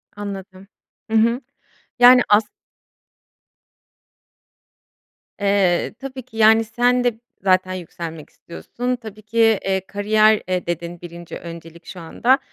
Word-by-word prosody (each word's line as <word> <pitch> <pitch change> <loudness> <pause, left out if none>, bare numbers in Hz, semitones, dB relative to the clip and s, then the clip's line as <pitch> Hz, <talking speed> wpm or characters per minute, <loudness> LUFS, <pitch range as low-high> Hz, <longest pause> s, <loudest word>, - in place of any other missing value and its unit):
Anladım. 195 -2 -8 0.4
Hı 225 - +3
hı. 235 +3 +2 0.6
Yani 250 +1 +8
as 210 0 +4 2.9
Eee, 195 -3 +1
tabii 265 -1 -7
ki, 225 -2 -15
yani, 220 +1 +5
sen 245 +2 +1
de 235 -2 -1 0.2
zaten 185 -1 +2
yükselmek 165 -3 -8
istiyorsun, 245 +8 -5
tabii 215 -3 -11
ki, 220 +2 -9 0.3
eee, 190 -1 0
kariyer, 215 +2 +3
eee, 185 -1 -2
dedin 170 0 -5
1'nci 170 -1 -9
öncelik 170 0 -11
şu 180 - -9
anda. 245 - +1
205 Hz, 115 wpm, -20 LUFS, 175-225 Hz, 2.9 s, Yani